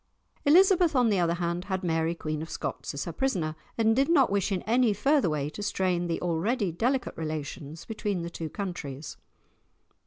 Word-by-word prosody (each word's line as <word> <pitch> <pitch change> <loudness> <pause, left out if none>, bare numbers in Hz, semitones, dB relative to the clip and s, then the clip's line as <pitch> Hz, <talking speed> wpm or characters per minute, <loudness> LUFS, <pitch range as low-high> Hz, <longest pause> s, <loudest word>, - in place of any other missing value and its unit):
Elizabeth, 355 +1 +5
on 245 -3 +4
the 200 - +2
other 170 -1 +2
hand, 175 +1 -2
had 190 -1 -2
Mary 165 -1 0
Queen 155 -2 -3
of 160 - -6
Scots - - -4
as - - -3
her - - -5
prisoner, 180 - -1 0.2
and 225 -1 +3
did 270 +4 +2
not 275 -10 +4
wish 200 0 +1
in 185 - -1
any 235 0 +3
further 275 - +2
way 145 -2 -1
to 205 - -7
strain 185 -3 0
the 165 - -1
already 185 +5 0
delicate 245 +10 0
relations 155 0 -5
between 205 -5 -2
the 170 - -5
two 165 -2 -5
countries. 155 -7 -6
185 Hz, 185 wpm, -28 LUFS, 165-230 Hz, 0.2 s, Elizabeth